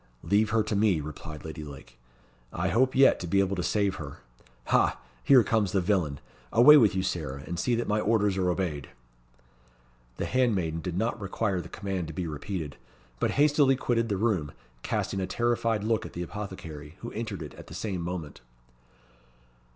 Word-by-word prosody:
"Leave 105 +2 +2
her 110 0 +2
to 105 - -2
me," 100 -5 +3
replied 75 0 -8
Lady 80 -1 -6
Lake. 65 -5 -12 0.5
"I - - -1
hope 130 +3 +2
yet 135 +1 +6
to 90 - -5
be 100 +4 +2
able 100 0 +1
to 90 - -2
save 100 +1 0
her. 70 -3 -7 0.5
Ha! - - +3 0.2
here 130 -4 +7
comes 105 -2 +1
the 100 - +3
villain. 90 -7 0 0.3
Away 125 +6 +8
with 110 -10 +5
you, 95 - 0
Sarah, 75 -6 -3
and 85 +2 -4
see 120 +8 +1
that 120 - -2
my 105 +1 +1
orders 105 -2 +2
are 95 -1 +1
obeyed." 85 -6 -2 1.3
The - - -2
handmaiden 95 -11 +1
did 90 -1 -4
not 115 +2 -1
require 100 -1 -1
the 85 - -11
command 95 -4 -4
to 80 - -7
be 90 +2 -3
repeated, 80 -1 -5 0.4
but - - +1
hastily 145 -2 +4
quitted 115 -3 0
the 100 - 0
room, 95 -9 0 0.3
casting 95 - -2
a 95 - -2
terrified 115 -2 0
look 110 0 +1
at - - -9
the 85 - -4
apothecary, 85 -6 -7
who 120 - -6
entered 110 -6 -4
it 75 - -9
at - - -12
the - - -9
same 95 -5 -3
moment. 85 -5 -5
95 Hz, 185 wpm, -28 LUFS, 80-110 Hz, 1.3 s, Away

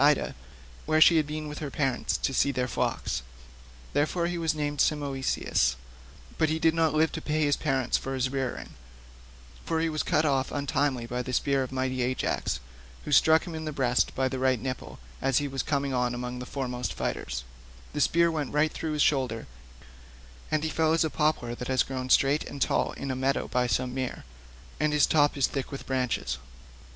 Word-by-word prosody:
Ida, 145 0 +3 0.5
where 155 - +3
she 165 +1 +7
had 155 -2 +2
been 155 0 -4
with 150 0 -6
her 150 - -4
parents 135 -3 0
to 135 - -1
see 140 - +3
their 125 -2 -1
flocks. 115 - -1 0.7
Therefore 165 +4 +1
he 175 0 -2
was 160 -1 0
named 145 -1 -1
Simoeisius, 135 - +1 0.6
but 160 - +3
he 160 - +1
did 160 0 +3
not 160 -2 +2
live 160 +1 +3
to - - -5
pay 155 +1 -1
his 145 -1 +3
parents 135 -4 0
for 135 0 -4
his 130 0 0
rearing, 135 -2 -3 0.9
for 165 -1 -1
he 165 0 +1
was 155 -1 -1
cut 155 - +2
off 135 -2 +1
untimely 140 -3 0
by 125 +1 -3
the 130 - -5
spear 140 +1 +2
of 130 - -3
mighty 130 -1 -1
Ajax, 130 +1 -1 0.5
who - - -5
struck 160 +3 +5
him 170 - -6
in 160 0 -5
the 155 - -2
breast 125 -4 +1
by 130 0 +1
the 130 0 -3
right 130 -2 +2
nipple 130 +2 -5 0.2
as 135 -2 +2
he 145 - +1
was 135 -1 -2
coming 140 -2 -1
on 125 -1 0
among 125 0 -4
the 125 - -7
foremost 125 -3 -3
fighters; - - -3 0.5
the 150 - -1
spear 170 +2 +4
went 150 -4 -2
right 155 +1 +2
through 160 -1 -3
his 150 - +3
shoulder, 130 -6 +1 1.0
and 155 0 0
he 160 - 0
fell 160 -1 +2
as 165 - +3
a 160 - -1
poplar 150 -6 0
that 125 +1 -6
has 130 -1 +3
grown 130 -1 -5
straight 140 +3 +4
and 140 - -7
tall - - +1
in 140 -1 -4
a - - -2
meadow 135 +1 0
by 125 0 +1
some 125 +3 0
mere, 130 -1 -3 0.6
and 150 0 +2
its 145 - +5
top 145 -2 +3
is 135 - +4
thick 135 -2 -3
with 135 - -7
branches. 125 - -1
140 Hz, 205 wpm, -28 LUFS, 130-155 Hz, 1.0 s, she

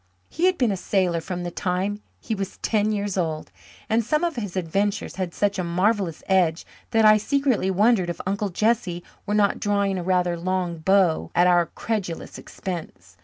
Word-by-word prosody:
He 335 - 0
had 370 -1 +2
been 245 -5 +2
a 195 - -2
sailor 180 -3 0
from 180 +1 -5
the 175 - -4
time 190 +4 -2 0.2
he - - -4
was 195 -2 -4
ten 215 -1 +1
years 200 -2 -1
old, 155 - -3 0.4
and 225 +1 +2
some 300 +8 0
of 340 -2 0
his 205 -7 -5
adventures 195 +5 -1
had 185 -2 -2
such 200 +2 0
a - - 0
marvellous 185 0 0
edge 180 -4 +2 0.2
that 225 -1 +3
I 215 0 +8
secretly 260 -3 +1
wondered 195 -1 +3
if 175 - -4
Uncle 200 +2 -1
Jesse 195 -3 0 0.2
were 210 - 0
not 205 -1 +2
drawing 200 -2 0
a - - -4
rather 180 -1 +1
long 180 -1 -2
bow 185 -1 +2
at 175 - +5
our 175 -2 +4
credulous 200 -7 -4
expense. 175 -4 -7
195 Hz, 185 wpm, -24 LUFS, 175-210 Hz, 0.4 s, I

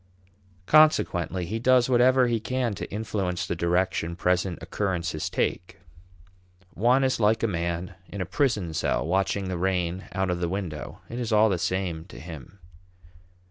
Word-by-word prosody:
Consequently 95 - +3
he 110 +6 -3
does 125 0 +4
whatever 130 +1 +4
he 120 -2 +1
can 125 0 -1
to - - -6
influence 95 -3 -2
the 85 - -2
direction 85 0 0
present 90 0 0
occurrences 90 -5 -2
take. 90 - -2 1.0
One 125 +6 +3
is 130 -2 +1
like 110 +1 +2
a - - +3
man 85 -1 -3
in 100 - -8
a 90 - -1
prison 100 - 0
cell - - 0
watching 95 +2 0
the 90 -2 -3
rain 90 -1 -1
out 95 -1 0
of 90 - -2
the 85 -1 -1
window; 90 -5 -5
it 120 - -6
is 120 -2 -3
all 110 +1 +5
the 95 -3 0
same 90 -3 -2
to - - -12
him. 80 +1 -10
95 Hz, 160 wpm, -26 LUFS, 85-110 Hz, 1.0 s, all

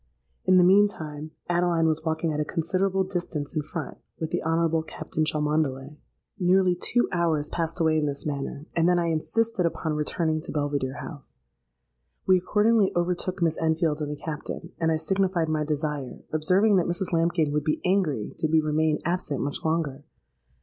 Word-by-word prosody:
In 185 0 +5
the 180 - +7
mean 200 +3 +6
time 155 -5 -7 0.2
Adeline 175 -1 +2
was 160 0 0
walking 160 0 -1
at 150 - -2
a - - +2
considerable 185 +5 0
distance 175 -6 -4
in 155 - +1
front, 155 +1 -6 0.2
with 160 0 -3
the - - 0
Honourable 165 0 +1
Captain 155 0 -4
Cholmondeley. 150 -2 -1 0.4
"Nearly 185 0 +4
two 240 +7 +1
hours 165 -4 0
passed 165 -1 -2
away 160 -1 +3
in 150 - 0
this 140 -1 -4
manner; 140 0 -4
and 165 +1 +3
then 180 - +4
I 170 -1 +1
insisted 220 +6 0
upon 165 -1 -1
returning 155 +1 -1
to - - -7
Belvidere 145 -2 -1
House. 145 -4 -10 0.9
We 185 -1 +5
accordingly 210 +2 +3
overtook 180 +1 -1
Miss 165 -1 +1
Enfield 160 -1 +1
and 150 - -2
the - - -3
Captain; 160 +3 -6
and 165 -1 +2
I 160 - +2
signified 185 0 0
my 155 -1 0
desire, 150 -3 -3
observing 190 +6 +3
that 180 - +2
Mrs 175 +1 -2
Lambkin 165 -2 +2
would 150 0 0
be 155 - 0
angry 180 - +1
did 155 - 0
we 160 - +5
remain 155 0 +1
absent 170 -5 -1
much 145 0 -3
longer. 160 -4 -1
160 Hz, 175 wpm, -26 LUFS, 150-175 Hz, 0.9 s, the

